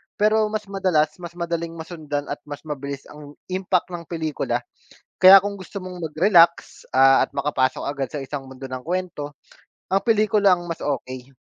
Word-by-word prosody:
Pero 215 Hz, +1 st, +3 dB
mas 215 Hz, 0 st, -3 dB
madalas, 180 Hz, -6 st, +1 dB
mas 170 Hz, -1 st, -9 dB
madaling 170 Hz, -1 st, -3 dB
masundan 155 Hz, -3 st, -5 dB
at 145 Hz, -, -4 dB
mas 145 Hz, -1 st, -8 dB
mabilis 140 Hz, -2 st, -6 dB
ang 150 Hz, -1 st, -12 dB, 0.2 s
impact 185 Hz, -1 st, 0 dB
ng 170 Hz, -1 st, -7 dB
pelikula. 160 Hz, -3 st, -2 dB, 0.6 s
Kaya 190 Hz, +1 st, +11 dB
kung 200 Hz, +1 st, -3 dB
gusto 195 Hz, 0 st, -8 dB
mong 185 Hz, -2 st, -8 dB
magrelax, 170 Hz, +1 st, +3 dB
ah 135 Hz, +1 st, +5 dB
at -, -, -2 dB
makapasok 130 Hz, -3 st, -1 dB
agad 140 Hz, -3 st, -3 dB
sa 150 Hz, -, -5 dB
isang 135 Hz, +1 st, -5 dB
mundo 130 Hz, 0 st, -8 dB
ng 130 Hz, -1 st, -6 dB
kuwento, 165 Hz, -4 st, -4 dB, 0.5 s
ang 195 Hz, +1 st, +1 dB
pelikula 210 Hz, -3 st, +3 dB
ang 175 Hz, -1 st, -1 dB
mas 165 Hz, -, -5 dB
okey, 130 Hz, -2 st, -4 dB
165 Hz, 165 wpm, -23 LUFS, 145-185 Hz, 0.6 s, Kaya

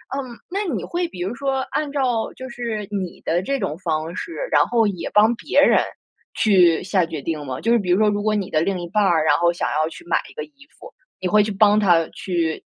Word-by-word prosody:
嗯， 255 Hz, -4 st, -6 dB
那 400 Hz, +3 st, -2 dB
你 200 Hz, -, -3 dB
会 350 Hz, 0 st, -2 dB
比 180 Hz, -, -11 dB
如 195 Hz, +7 st, -3 dB
说 270 Hz, -1 st, -1 dB
按 300 Hz, -2 st, -2 dB
照 250 Hz, -5 st, 0 dB
就 260 Hz, -, -8 dB
是 230 Hz, -4 st, -4 dB
你 190 Hz, -4 st, -4 dB
的 170 Hz, +2 st, +1 dB
这 275 Hz, +6 st, -2 dB
种 175 Hz, -6 st, -3 dB
方 160 Hz, 0 st, -2 dB
式， 335 Hz, -, -6 dB, 0.2 s
然 -, -, +5 dB
后 230 Hz, -3 st, +2 dB
也 185 Hz, -4 st, -4 dB
帮 215 Hz, +3 st, +4 dB
别 -, -, 0 dB
人 -, -, +5 dB, 0.5 s
去 180 Hz, -7 st, +4 dB
下 185 Hz, -2 st, +1 dB
决 160 Hz, -3 st, -6 dB
定 155 Hz, -2 st, -4 dB
吗？ 130 Hz, -1 st, -5 dB
就 230 Hz, -, +1 dB
是 235 Hz, -, +4 dB
比 185 Hz, -4 st, -4 dB
如 180 Hz, -, +4 dB
说 215 Hz, -1 st, +4 dB
如 205 Hz, 0 st, -1 dB
果 215 Hz, 0 st, +1 dB
你 200 Hz, -3 st, -2 dB
的 155 Hz, -, +1 dB
另 190 Hz, +1 st, -1 dB
一 175 Hz, -, -6 dB
半 210 Hz, +3 st, +1 dB
儿， 165 Hz, -5 st, +2 dB
然 -, -, +4 dB
后 170 Hz, 0 st, +3 dB
想 170 Hz, -, -2 dB
要 155 Hz, +2 st, 0 dB
去 345 Hz, -, -12 dB
买 -, -, +2 dB
一 -, -, -15 dB
个 465 Hz, -, -5 dB
衣 280 Hz, -2 st, -21 dB
服， -, -, -12 dB, 0.3 s
你 185 Hz, -, -2 dB
会 210 Hz, +2 st, +4 dB
去 210 Hz, -, -3 dB
帮 205 Hz, +1 st, +4 dB
她 175 Hz, -6 st, +3 dB
去 170 Hz, -4 st, -2 dB
205 Hz, 270 characters per minute, -21 LUFS, 170-235 Hz, 0.5 s, 然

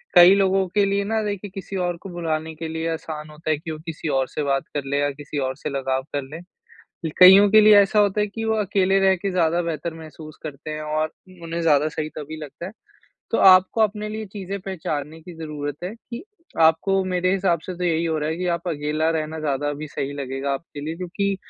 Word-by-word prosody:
कई 180 Hz, +2 st, +9 dB
लोगों 195 Hz, -1 st, +2 dB
के 205 Hz, -1 st, +4 dB
लिए 200 Hz, 0 st, 0 dB
ना 220 Hz, +2 st, -1 dB
देखिए, 205 Hz, -1 st, -4 dB
किसी 195 Hz, 0 st, -7 dB
और 175 Hz, -2 st, -1 dB
को 195 Hz, -, -8 dB
भुलाने 160 Hz, -2 st, -3 dB
के 165 Hz, +1 st, -5 dB
लिए 160 Hz, +1 st, -3 dB
आसान 155 Hz, -1 st, -6 dB
होता 155 Hz, +1 st, -7 dB
है 155 Hz, -, +2 dB
कि 160 Hz, +2 st, -7 dB
वो 155 Hz, -, -5 dB
किसी 165 Hz, 0 st, -5 dB
और 130 Hz, -, 0 dB
से 150 Hz, -, -4 dB
बात 135 Hz, -1 st, 0 dB
कर 145 Hz, -, -2 dB
लें 140 Hz, +1 st, -1 dB
या 145 Hz, -, +1 dB
किसी 145 Hz, +1 st, -8 dB
और 130 Hz, -, -4 dB
से -, -, -4 dB
लगाव 135 Hz, -1 st, -1 dB
कर 145 Hz, -, 0 dB
लें। 160 Hz, -, -7 dB, 0.7 s
लि 160 Hz, -, -1 dB
कइयों 190 Hz, +2 st, +9 dB
के 215 Hz, +1 st, +8 dB
लिए 215 Hz, 0 st, +7 dB
ऐसा 200 Hz, +2 st, +2 dB
होता 205 Hz, 0 st, +3 dB
है 210 Hz, -, +2 dB
कि 225 Hz, +2 st, -6 dB
वो 220 Hz, 0 st, +1 dB
अकेले 195 Hz, -2 st, +2 dB
रह 190 Hz, -1 st, +4 dB
के 195 Hz, +2 st, -3 dB
ज़्यादा 175 Hz, -1 st, +2 dB
बेहतर 165 Hz, 0 st, -4 dB
महसूस 155 Hz, -1 st, -11 dB
करते 155 Hz, 0 st, -7 dB
हैं 155 Hz, 0 st, -4 dB
और 155 Hz, +1 st, -1 dB, 0.2 s
म 180 Hz, -2 st, -17 dB
उन्हें 165 Hz, 0 st, -4 dB
ज़्यादा 150 Hz, -2 st, +3 dB
सही 155 Hz, -1 st, -4 dB
तभी 155 Hz, +1 st, -7 dB
लगता 150 Hz, +4 st, -8 dB
है। 190 Hz, -, -8 dB, 0.6 s
तो -, -, +1 dB
आपको 185 Hz, +3 st, +6 dB
अपने 210 Hz, 0 st, +1 dB
लिए 215 Hz, 0 st, -5 dB
चीज़ें 200 Hz, 0 st, -6 dB
पहचानने 160 Hz, -5 st, -5 dB
की 175 Hz, +2 st, -11 dB
ज़रूरत 145 Hz, -3 st, -5 dB
है 190 Hz, +4 st, -4 dB
कि, 235 Hz, +3 st, -9 dB, 0.4 s
आपको 165 Hz, +5 st, +4 dB
मेरे 185 Hz, 0 st, 0 dB
हिसाब 185 Hz, -3 st, +1 dB
से 185 Hz, -, -4 dB
तो 180 Hz, -, -3 dB
यही 165 Hz, -1 st, +1 dB
हो 160 Hz, -1 st, 0 dB
रहा 150 Hz, 0 st, -2 dB
है 160 Hz, -, -2 dB
कि 180 Hz, -, -3 dB
आप 170 Hz, -, -5 dB
अकेला 155 Hz, 0 st, -1 dB
रहना 155 Hz, 0 st, -4 dB
ज़्यादा 145 Hz, -1 st, -1 dB
अभी 145 Hz, +1 st, -5 dB
सही 140 Hz, 0 st, -4 dB
लगेगा 140 Hz, 0 st, -3 dB
आपके 145 Hz, +1 st, -6 dB
लिए 160 Hz, +2 st, -4 dB
क्योंकि, 190 Hz, +2 st, -2 dB
165 Hz, 235 wpm, -23 LUFS, 155-195 Hz, 0.7 s, कई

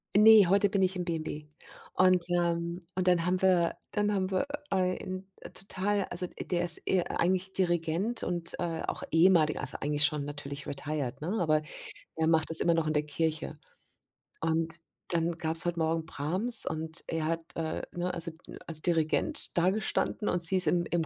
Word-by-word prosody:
Ne, 215 Hz, 0 st, +8 dB
heute 200 Hz, +3 st, +3 dB
bin 200 Hz, -1 st, 0 dB
ich 190 Hz, 0 st, +1 dB
im 180 Hz, -, -3 dB
B&B. 155 Hz, -3 st, -5 dB, 0.5 s
Und, 185 Hz, -1 st, +3 dB
ähm, 170 Hz, 0 st, -2 dB
und 185 Hz, 0 st, -2 dB
dann 175 Hz, -2 st, +3 dB
haben 180 Hz, +1 st, 0 dB
wir 180 Hz, -3 st, +2 dB
dann 210 Hz, 0 st, 0 dB
haben 190 Hz, -2 st, -1 dB
wir 190 Hz, +7 st, -1 dB, 0.2 s
ein, 185 Hz, 0 st, -2 dB
äh, -, -, -11 dB
total 195 Hz, +1 st, -2 dB
also 180 Hz, +1 st, -3 dB
der 175 Hz, 0 st, -3 dB
ist 170 Hz, -2 st, +9 dB
e 185 Hz, -, +1 dB
eigentlich 185 Hz, +3 st, -1 dB
Dirigent 175 Hz, +5 st, -1 dB
und, 175 Hz, -1 st, -3 dB
äh, 165 Hz, -2 st, -3 dB
auch -, -, -4 dB
ehemaliger 165 Hz, -2 st, +3 dB
also -, -, -4 dB
eigentlich 150 Hz, 0 st, -1 dB
schon 150 Hz, -1 st, 0 dB
natürlich 145 Hz, -1 st, -7 dB
retired, 145 Hz, -2 st, -5 dB
ne, 180 Hz, +8 st, -3 dB
aber 155 Hz, -3 st, +1 dB, 0.6 s
er 160 Hz, 0 st, +1 dB
macht 160 Hz, -1 st, +1 dB
es 165 Hz, -, +9 dB
immer 170 Hz, -, +2 dB
noch 165 Hz, -1 st, 0 dB
in 155 Hz, -, 0 dB
der 150 Hz, 0 st, 0 dB
Kirche. 160 Hz, +1 st, -3 dB, 0.8 s
Und 160 Hz, 0 st, -1 dB, 0.3 s
dann 170 Hz, 0 st, 0 dB
gab's 160 Hz, 0 st, 0 dB
heute 175 Hz, -1 st, -2 dB
Morgen 160 Hz, 0 st, -1 dB
Brahms 185 Hz, +11 st, +4 dB
und 160 Hz, +1 st, -3 dB
er 160 Hz, -1 st, -2 dB
hat 165 Hz, +1 st, -2 dB
äh, 160 Hz, -1 st, -3 dB
ne, 175 Hz, +1 st, -3 dB
also, 170 Hz, 0 st, -1 dB, 0.4 s
als 160 Hz, -2 st, +1 dB
Dirigent 165 Hz, -1 st, 0 dB
dagestanden 195 Hz, +3 st, 0 dB
und 175 Hz, -, -1 dB
sie 185 Hz, +3 st, +8 dB
ist 185 Hz, -, +2 dB
im 175 Hz, -1 st, +1 dB
im 170 Hz, -1 st, 0 dB
170 Hz, 180 wpm, -29 LUFS, 160-185 Hz, 0.8 s, ist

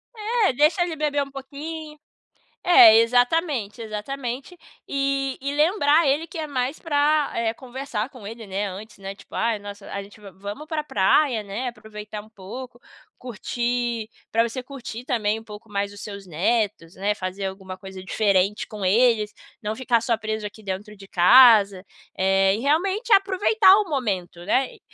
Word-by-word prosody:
É, 435 Hz, -, +1 dB
deixa 305 Hz, +6 st, +3 dB
ele 340 Hz, -2 st, -3 dB
beber 295 Hz, -2 st, 0 dB
um 275 Hz, -, -11 dB
pouquinh 300 Hz, +3 st, -8 dB, 0.7 s
é, 225 Hz, -11 st, +8 dB
exatamente, 245 Hz, -, +1 dB
exatamente. 250 Hz, -, -5 dB, 0.3 s
E 275 Hz, -1 st, -1 dB
e 280 Hz, +1 st, -2 dB
lembrar 310 Hz, 0 st, +3 dB
ele 295 Hz, +4 st, +1 dB
que 355 Hz, -, -9 dB
é 310 Hz, -1 st, -3 dB
mais 260 Hz, +1 st, -2 dB
pra, 300 Hz, -1 st, +2 dB
eh, 230 Hz, -1 st, 0 dB
conversar 255 Hz, -2 st, -5 dB
com 230 Hz, -7 st, -11 dB
ele, 225 Hz, 0 st, -8 dB
né, 195 Hz, +1 st, -2 dB
antes, 210 Hz, +3 st, -9 dB
né, 195 Hz, 0 st, -7 dB
tipo -, -, -18 dB
"ai, 230 Hz, -2 st, +1 dB
nossa, 205 Hz, 0 st, -10 dB
a 200 Hz, 0 st, -4 dB
gente 205 Hz, +2 st, -16 dB
vai 200 Hz, -2 st, -12 dB
va 185 Hz, -, -26 dB
vamos 205 Hz, +10 st, -7 dB
pra 310 Hz, -2 st, -2 dB
praia, 225 Hz, +1 st, +2 dB
né, 210 Hz, +6 st, -4 dB
aproveitar 215 Hz, -1 st, -9 dB
um 215 Hz, -, -18 dB
pouco, 240 Hz, +5 st, -9 dB, 0.4 s
curtir, 240 Hz, -1 st, -3 dB, 0.2 s
pra 230 Hz, +1 st, +3 dB
você 255 Hz, +3 st, -5 dB
curtir 250 Hz, -2 st, -8 dB
também 220 Hz, -4 st, 0 dB
um 225 Hz, -, -14 dB
pouco 210 Hz, 0 st, -12 dB
mais 200 Hz, 0 st, -2 dB
os 205 Hz, -, -11 dB
seus 200 Hz, -2 st, -8 dB
netos, 185 Hz, 0 st, -1 dB
né, 205 Hz, +2 st, -1 dB
fazer 190 Hz, 0 st, -4 dB
alguma 190 Hz, -1 st, -6 dB
coisa 190 Hz, -1 st, -10 dB
diferente 200 Hz, 0 st, +1 dB
com 210 Hz, -2 st, -7 dB
eles, 215 Hz, 0 st, +3 dB, 0.3 s
não 210 Hz, 0 st, -2 dB
ficar 235 Hz, -2 st, +1 dB
só 230 Hz, -1 st, 0 dB
preso 215 Hz, -1 st, -4 dB
aqui 215 Hz, +1 st, -8 dB
dentro 200 Hz, +2 st, -5 dB
de 195 Hz, 0 st, -13 dB
casa", 200 Hz, -1 st, +6 dB, 0.3 s
eh, 195 Hz, +1 st, +3 dB
e -, -, -4 dB
realmente 380 Hz, -, +1 dB
aproveitar 390 Hz, +1 st, +5 dB
o 420 Hz, -3 st, 0 dB
momento, 190 Hz, -, -2 dB
né, 260 Hz, +5 st, +1 dB
eh, -, -, -20 dB
230 Hz, 175 wpm, -23 LUFS, 205-280 Hz, 0.7 s, é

